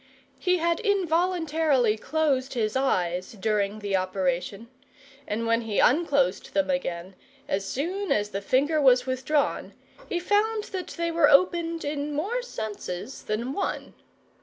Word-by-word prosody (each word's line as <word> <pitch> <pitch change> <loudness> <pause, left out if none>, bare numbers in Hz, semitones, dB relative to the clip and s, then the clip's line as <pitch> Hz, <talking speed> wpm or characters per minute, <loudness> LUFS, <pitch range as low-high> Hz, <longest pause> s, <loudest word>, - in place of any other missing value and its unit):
He 365 -1 +2
had 335 0 +1
involuntarily 325 - +1
closed 275 0 0
his 220 -1 -1
eyes 180 -9 0
during 210 0 -1
the 205 -2 -2
operation, 185 +3 -1 0.6
and 225 +2 -2
when 230 0 +2
he 220 -3 -3
unclosed 280 - +2
them 290 -1 +2
again, 185 -9 -3 0.3
as 195 0 -1
soon 370 +9 -2
as 210 0 +1
the 195 - -3
finger 290 +9 +2
was 250 -2 +5
withdrawn, 265 +3 -1 0.4
he 350 - -1
found 420 +4 +1
that 370 -1 -3
they 335 0 -1
were 330 -3 +4
opened 335 +2 +3
in 290 0 -3
more 420 +12 -1
senses 220 - -6
than 235 +5 -3
one. 390 - -3
275 Hz, 135 wpm, -26 LUFS, 215-335 Hz, 0.6 s, was